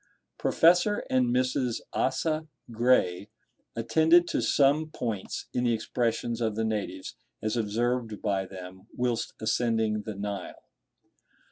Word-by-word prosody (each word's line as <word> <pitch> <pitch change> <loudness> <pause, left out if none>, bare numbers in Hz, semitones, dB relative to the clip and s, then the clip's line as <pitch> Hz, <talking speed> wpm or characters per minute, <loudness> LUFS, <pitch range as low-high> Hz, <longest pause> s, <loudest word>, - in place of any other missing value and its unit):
Professor 180 +5 +3
and 130 -1 +3
Mrs. 125 0 0
Asa 155 +4 0 0.2
Gray 110 -5 +2 0.5
attended 160 +9 +4
to - - 0
some 145 +3 +3
points 115 -9 -4
in 125 - 0
the 120 - +3
expressions 115 +1 -2
of 110 -2 0
the 110 +1 0
natives, 100 -4 -3 0.3
as 110 +1 0
observed 115 0 -1
by 95 -2 -1
them 95 0 -10
whilst 120 -2 -1
ascending 110 -1 +1
the 110 -1 -6
Nile. 100 0 -5
115 Hz, 120 wpm, -28 LUFS, 105-130 Hz, 0.5 s, attended